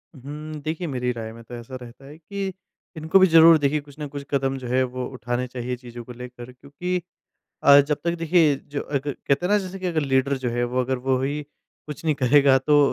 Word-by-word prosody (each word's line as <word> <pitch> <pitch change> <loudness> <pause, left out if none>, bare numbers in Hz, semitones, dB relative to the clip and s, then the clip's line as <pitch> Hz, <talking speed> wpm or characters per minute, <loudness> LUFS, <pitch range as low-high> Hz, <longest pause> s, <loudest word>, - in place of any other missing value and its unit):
हुँ, 150 +3 -8
देखिए 160 +3 -3
मेरी 125 -3 -1
राय 115 -2 -6
में 115 - -12
तो 120 +2 -9
ऐसा 120 +2 -9
रहता 125 +3 -12
है 145 +3 -12
कि 195 +4 -5 0.4
इनको 160 +5 +3
भी 190 - +7
ज़रूर 165 -1 +8
देखिए, 145 0 +1
कुछ 145 -1 -16
न 150 - -4
कुछ 140 0 -7
कदम 135 -1 0
जो 130 -2 -7
है, 130 +2 +2
वो 125 0 -4
उठाने 125 0 -3
चाहिए 125 0 -4
चीज़ों 120 -1 -10
को 125 - -11
लेकर। 125 0 -10
क्योंकि 180 +8 -4 0.6
अ, 140 0 +8
जब 145 +1 0
तक 170 0 +1
देखिए, 165 -2 +4
जो 140 +1 -6
अग 140 -2 -2
कहते 140 +4 -1
हैं - - -2
ना, 210 - +4
जैसे 190 0 -6
कि 185 - -4
अगर 165 -3 0
लीडर 135 -1 +1
जो 130 -2 -2
है, 120 +1 0
वो 125 +1 -1
अगर 130 +1 -1
वो 130 0 0
ही 145 +3 -2 0.4
कुछ 150 +2 -8
नहीं 155 -2 +2
करेगा, 135 +1 +5
तो 145 +3 +3
140 Hz, 230 wpm, -24 LUFS, 125-155 Hz, 0.6 s, ज़रूर